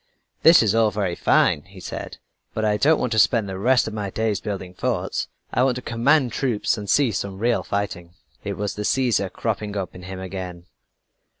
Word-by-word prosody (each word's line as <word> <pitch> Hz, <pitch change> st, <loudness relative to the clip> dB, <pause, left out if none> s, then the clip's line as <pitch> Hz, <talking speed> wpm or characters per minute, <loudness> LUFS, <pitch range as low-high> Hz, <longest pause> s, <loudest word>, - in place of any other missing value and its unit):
"This 165 Hz, -6 st, +7 dB
is 105 Hz, -2 st, +2 dB
all 115 Hz, -1 st, +4 dB
very 100 Hz, -4 st, -2 dB
fine," -, -, +3 dB
he -, -, -15 dB
said; -, -, -7 dB, 0.4 s
"but 110 Hz, -, 0 dB
I 105 Hz, -1 st, +2 dB
don't 155 Hz, +7 st, +4 dB
want 125 Hz, -, -1 dB
to 110 Hz, -, +2 dB
spend 110 Hz, 0 st, +3 dB
the 95 Hz, -1 st, -5 dB
rest 125 Hz, +3 st, +3 dB
of 110 Hz, -, -5 dB
my 105 Hz, -2 st, -3 dB
days 110 Hz, 0 st, -1 dB
building 95 Hz, -3 st, -5 dB
forts. -, -, -2 dB, 0.3 s
I 125 Hz, -, +2 dB
want 130 Hz, -1 st, +3 dB
to 125 Hz, -, -6 dB
command 125 Hz, +3 st, +2 dB
troops 120 Hz, -5 st, 0 dB
and 105 Hz, -3 st, -7 dB
see 140 Hz, -5 st, +3 dB
some 95 Hz, -1 st, -4 dB
real 120 Hz, +3 st, +1 dB
fighting." 90 Hz, -4 st, -4 dB, 0.3 s
It -, -, -4 dB
was 105 Hz, -1 st, -2 dB
the 105 Hz, -, -5 dB
Caesar 115 Hz, -5 st, +1 dB
cropping 105 Hz, +1 st, -3 dB
up 95 Hz, -3 st, -4 dB
in 90 Hz, -, -11 dB
him 95 Hz, +1 st, -7 dB
again. 90 Hz, -2 st, -6 dB
105 Hz, 205 wpm, -23 LUFS, 95-120 Hz, 0.4 s, This